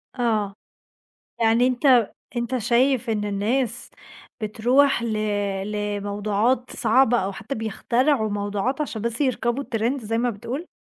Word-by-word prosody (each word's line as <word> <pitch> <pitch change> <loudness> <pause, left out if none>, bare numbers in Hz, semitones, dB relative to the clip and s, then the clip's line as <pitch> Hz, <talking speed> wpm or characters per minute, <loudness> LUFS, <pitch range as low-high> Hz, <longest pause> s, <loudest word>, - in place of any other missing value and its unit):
آه. 215 -5 0 0.8
يعني 230 +2 +4
أنت 250 -3 +3 0.2
أنت 240 +2 -1
شايف 245 +2 +2
إن 210 -2 -1
الناس 225 +4 -1 0.5
بتروح 240 +5 +2
ل 230 - -2 0.6
لموضوعات 205 +4 -1
صعبة 240 0 +4
أو 195 +1 -2
حتّى 220 +7 -6
بيخترعوا 225 +3 0
موضوعات 205 +7 -2
عشان 225 -7 -4
بس 235 +4 -2
يركبوا 255 0 0
الtrend 235 +3 -1
زي 225 +1 -2
ما 245 +1 +1
بتقول؟ 240 - -5
235 Hz, 120 wpm, -23 LUFS, 210-255 Hz, 0.8 s, يعني